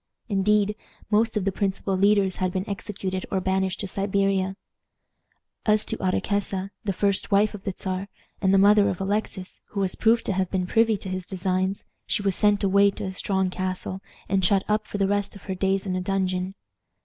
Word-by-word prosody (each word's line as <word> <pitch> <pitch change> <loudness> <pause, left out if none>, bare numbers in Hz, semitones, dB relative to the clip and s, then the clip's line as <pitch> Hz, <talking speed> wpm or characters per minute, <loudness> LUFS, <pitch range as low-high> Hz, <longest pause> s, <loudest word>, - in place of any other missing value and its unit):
Indeed, 210 +1 +2 0.4
most 220 +1 +3
of 195 - -1
the 195 - +2
principal 195 0 -1
leaders 200 -1 +3
had 185 -1 0
been 185 +1 -3
executed 195 -2 -4
or 190 - 0
banished 190 0 0
to - - -3
Siberia. 195 -1 0 1.1
As 215 -1 +3
to - - -3
Ottokesa, 195 0 -1
the 200 - 0
first 200 +1 +1
wife 205 +1 +3
of 205 -2 -9
the 195 - -2
Czar, 190 +1 -3 0.3
and 190 -1 +3
the 195 - +5
mother 205 +1 +6
of 180 - -3
Alexis, 195 -1 -3
who 200 - -5
was 190 -2 0
proved 230 +1 +2
to - - 0
have 190 -1 0
been 185 -2 -1
privy 225 +2 +3
to 190 - -8
his 185 -1 -4
designs, 185 +1 -1 0.2
she 205 - 0
was 195 -2 +2
sent 205 -1 +3
away 200 +1 +5
to 195 - -6
a 190 - -3
strong 190 -1 0
castle, 185 0 -3 0.3
and 190 0 +1
shut 195 +2 +3
up 215 +1 0
for - - -4
the 195 -1 +2
rest 205 0 -1
of 200 - -12
her 190 - -3
days 195 +1 0
in 185 -2 -1
a 185 - -1
dungeon. 185 0 -1
195 Hz, 200 wpm, -25 LUFS, 185-205 Hz, 1.1 s, mother